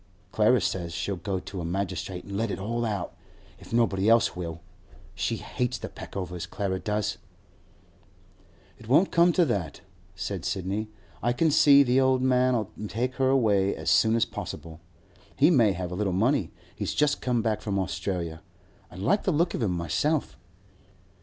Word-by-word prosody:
Clara - - +4
says 85 -3 -2
she'll 90 +3 -2
go 95 +2 -3
to 95 0 -7
a - - -5
magistrate 90 +1 -3
an' 100 - -7
let 115 +2 -1
it - - -3
all 115 +5 -2
out, 105 -5 -3 0.4
if - - -14
nobody 110 -3 +2
else 115 0 +4
will. 85 -2 -6 0.5
She - - -1
hates 125 0 -3
the - - -7
Peckovers, 90 -3 -6
Clara 95 -2 -2
does.' 105 0 -2 1.6
'It 110 - -13
won't 150 +10 +4
come 170 +1 +5
to 175 0 +4
that,' 95 - -3 0.3
said - - -4
Sidney. 100 +3 -2 0.3
'I 120 +1 +1
can 160 +5 +2
see 140 -1 +7
the 130 0 +3
old 130 -1 +2
man'll 125 -4 +2 0.2
take 125 +5 -2
her 130 -1 +2
away 105 -7 +2
as - - -1
soon 110 0 +4
as 115 0 +3
possible. 80 +1 -7 0.6
He 150 +6 +5
may 115 - +4
have 90 0 -5
a - - -4
little 95 -1 -1
money; 110 - +1 0.3
he's - - -3
just 145 0 +2
come 120 -3 0
back 110 -2 0
from 100 -2 -2
Australia. 90 -3 -3 0.5
I - - -14
like 175 - +1
the 190 - 0
look 170 +2 +1
of - - -3
him 110 - +1
myself. 90 - -1
105 Hz, 170 wpm, -27 LUFS, 95-130 Hz, 1.6 s, see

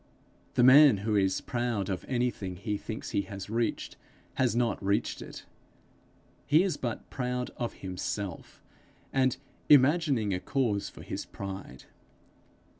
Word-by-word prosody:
The 125 - +4
man 135 -1 +8
who 110 -2 +1
is 95 -2 +2
proud 120 -5 -2
of 95 -2 -3
anything 120 -7 -1
he 105 +3 -3
thinks 110 +2 -6
he - - +1
has 100 0 -7
reached, 115 -1 -2 0.4
has 125 -3 +1
not 120 -4 0
reached 100 +1 0
it. - - -9 1.0
He 155 +5 +5
is 190 -3 0
but 120 -3 -5
proud 125 -1 -2
of 120 -1 -3
himself, 95 0 -5 0.5
and 130 -1 +2 0.3
imagining 140 - +4
a 90 - -1
cause 110 -4 -1
for - - -12
his - - -5
pride. 95 -10 -8
115 Hz, 135 wpm, -29 LUFS, 100-130 Hz, 1.0 s, man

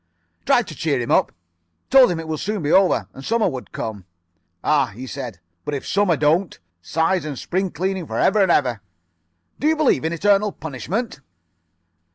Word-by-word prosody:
"Tried - - +4
to - - -7
cheer - - -1
him - - -3
up. - - +3 0.6
Told 265 -3 +7
him 175 -2 -2
it 165 - -7
would 155 -2 -3
soon 205 -1 -3
be 145 - 0
over. 180 - +3
And 135 - -11
Summer 230 +6 +1
would 130 -2 -5
come. 105 -4 -5 0.6
"'Ah,' 140 -7 +2
he 125 +3 -7
said, 125 -8 -7 0.2
'but 150 - -3
if 135 - -5
Summer 200 -5 +2
don't! 160 +5 +1 0.2
Size 165 - 0
and 150 -3 -5
spring 185 +7 -2
cleaning 185 0 -3
for - - -4
ever 205 +1 +3
and 190 -3 +4
ever. 125 - +1 0.8
Do 295 - +1
you 320 - +4
believe 305 - +2
in 160 - -1
eternal 200 +4 +2
punishment? 160 - -4
165 Hz, 185 wpm, -21 LUFS, 135-195 Hz, 0.8 s, Told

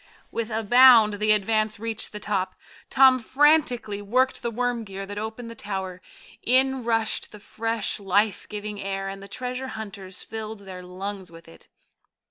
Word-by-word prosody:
With 230 -1 -3
a 225 0 -2
bound 230 -2 +7
the 215 0 +3
Advance 215 +1 +1
reached 225 0 -3
the 210 - -7
top. 195 -3 -2 0.3
Tom 265 -1 +6
frantically 250 -5 +2
worked 255 +6 +1
the 235 - -2
worm 240 0 -1
gear 195 -1 -7
that 205 +1 -6
opened 220 +2 -6
the - - -7
tower. 190 -4 -5 0.4
In 260 +1 +3
rushed 225 -1 0
the 210 - -11
fresh, 225 +1 -2
life 200 +1 +1
giving 210 0 -6
air, 195 0 -3
and 195 0 -6
the 200 - -10
treasure 255 +3 -5
hunters 195 -3 -8
filled 220 -1 -7
their 190 -2 -9
lungs 185 0 -6
with 165 0 -14
it. 80 - -16
215 Hz, 165 wpm, -25 LUFS, 195-235 Hz, 0.4 s, bound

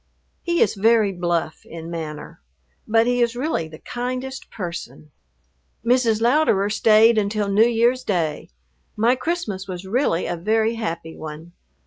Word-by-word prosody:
He 345 -1 +2
is 205 - 0
very 220 0 +3
bluff 175 -3 -2
in 165 0 -9
manner, 150 - -7 0.5
but 225 +1 +3
he 245 0 +1
is 235 0 +1
really 250 - -1
the 155 0 -11
kindest 255 +6 -5
person. 170 -5 -7 0.7
Mrs. 235 -3 +3
Louderer 235 -6 +3
stayed 220 +1 +5
until 205 0 -1
New 210 +4 +5
Year's 240 +2 +2
day. 165 -6 -2 0.5
My 235 +4 +3
Christmas 250 - -3
was 185 0 -6
really 195 -4 0
a 175 - -2
very 220 +6 +1
happy 170 -8 -5
one. 155 +2 -9
215 Hz, 140 wpm, -22 LUFS, 175-240 Hz, 0.7 s, stayed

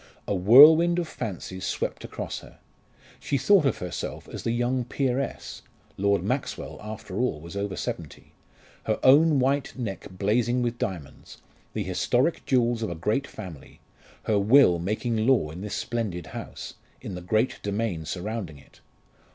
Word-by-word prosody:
A - - 0
whirlwind 150 - +7
of 175 -2 -1
fancies 95 - -6
swept - - -3
across - - -5
her. - - -16 0.6
She 140 - -1
thought 160 +3 +4
of - - 0
herself 90 -1 -5
as - - -7
the - - -2
young 120 +2 0
peeress 130 +2 -3 0.3
Lord 100 -2 +1
Maxwell 125 +7 -3
after 105 -2 -6
all 125 -11 0
was 85 +4 -10
over 100 -1 -3
seventy - - -6 0.5
her 110 - +1
own 150 +3 +6
white 135 +2 0
neck 100 -7 -5
blazing 115 +6 0
with 120 0 -2
diamonds, 85 -8 -6 0.4
the - - -2
historic 130 +7 0
jewels 120 -3 +2
of 110 - -2
a 85 - -4
great 110 +12 -1
family 90 -10 -10 0.4
her 105 -2 +2
will 100 -4 +5
making 110 +5 -1
law 115 - +3
in 85 +4 -8
this 105 0 -4
splendid 105 -8 -3
house - - -7 0.3
in - - -7
the 90 - -6
great 110 +8 0
domain 100 -5 -2
surrounding 90 0 -5
it. 70 - -20
110 Hz, 155 wpm, -26 LUFS, 95-130 Hz, 0.6 s, whirlwind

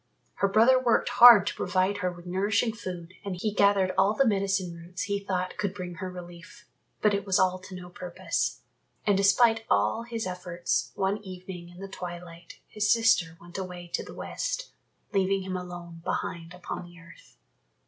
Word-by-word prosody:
Her 200 - +2
brother 230 +6 +5
worked 245 -3 +2
hard 235 -4 +9
to - - -1
provide 190 +2 0
her 180 -3 -1
with 175 0 -12
nourishing 205 +5 +1
food 185 -5 -7
and 200 -2 -4
he 205 +4 -2
gathered 200 -2 +3
all 195 +3 +3
the 275 - +3
medicine 195 -4 0
roots 170 +4 -6
he 200 -2 -1
thought 185 -2 -3
could 205 -2 -2
bring 180 -2 -6
her 185 - -3
relief, 175 +1 -11 0.4
but 210 -1 +4
it 200 0 0
was 195 -2 +2
all 185 0 +2
to 185 0 -10
no 180 -1 -8
purpose. 175 0 -3 0.4
And 205 - +4
despite 225 +3 +4
all 105 - +2
his 230 -1 -4
efforts, 180 -1 -2
one 195 +2 0
evening 185 -2 -8
in 175 - -15
the 195 +1 -7
twilight 175 -2 -9
his 210 0 0
sister 210 -8 +3
went 175 +2 -8
away 180 -2 -7
to - - -2
the - - -11
West, - - -4 0.4
leaving 195 0 +1
him 185 0 -4
alone 175 -2 -7
behind 170 +1 -4
upon 180 0 -6
the 175 0 -15
earth. 165 0 -17
185 Hz, 180 wpm, -28 LUFS, 175-205 Hz, 0.4 s, hard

